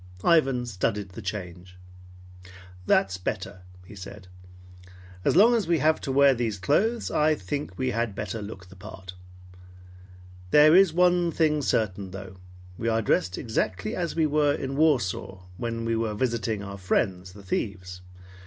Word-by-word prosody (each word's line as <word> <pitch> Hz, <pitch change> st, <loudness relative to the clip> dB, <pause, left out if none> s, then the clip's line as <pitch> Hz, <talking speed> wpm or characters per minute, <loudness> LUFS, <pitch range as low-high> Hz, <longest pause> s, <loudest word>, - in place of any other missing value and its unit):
Ivan 135 Hz, -7 st, +3 dB
studied 100 Hz, -2 st, -2 dB
the 95 Hz, +5 st, -9 dB
change. 90 Hz, -2 st, -7 dB, 1.1 s
"That's 95 Hz, -1 st, +2 dB
better," 95 Hz, 0 st, -5 dB, 0.2 s
he 100 Hz, -, -12 dB
said. 95 Hz, 0 st, -10 dB, 1.0 s
"As -, -, +2 dB
long 220 Hz, +7 st, +7 dB
as 220 Hz, -7 st, 0 dB
we 170 Hz, -1 st, +3 dB
have 155 Hz, +1 st, +2 dB
to 135 Hz, -, -3 dB
wear 140 Hz, 0 st, +5 dB
these 115 Hz, -4 st, -2 dB
clothes, 215 Hz, -, 0 dB
I 155 Hz, +1 st, +3 dB
think 140 Hz, +7 st, -5 dB
we 130 Hz, -1 st, -1 dB
had 115 Hz, -4 st, -2 dB
better 105 Hz, +1 st, -4 dB
look 95 Hz, -3 st, -9 dB
the 95 Hz, -, -14 dB
part. 95 Hz, -2 st, -10 dB, 1.4 s
There 150 Hz, -, +7 dB
is 190 Hz, -2 st, +6 dB
one 175 Hz, 0 st, +3 dB
thing 155 Hz, -2 st, +1 dB
certain 100 Hz, -7 st, -1 dB
though. 95 Hz, 0 st, -9 dB, 0.4 s
We 115 Hz, -, -2 dB
are 115 Hz, 0 st, +1 dB
dressed 90 Hz, -2 st, 0 dB
exactly 95 Hz, -4 st, -2 dB
as 175 Hz, -2 st, -3 dB
we 160 Hz, -1 st, +2 dB
were 150 Hz, -1 st, +2 dB
in 135 Hz, 0 st, -4 dB
Warsaw, 120 Hz, -, 0 dB
when 115 Hz, +1 st, -4 dB
we 115 Hz, 0 st, 0 dB
were 110 Hz, -2 st, -2 dB
visiting 115 Hz, -3 st, -1 dB
our 100 Hz, 0 st, -8 dB
friends, 90 Hz, 0 st, -1 dB
the 100 Hz, 0 st, -13 dB
thieves. 90 Hz, -2 st, -4 dB
110 Hz, 155 wpm, -26 LUFS, 95-150 Hz, 1.4 s, long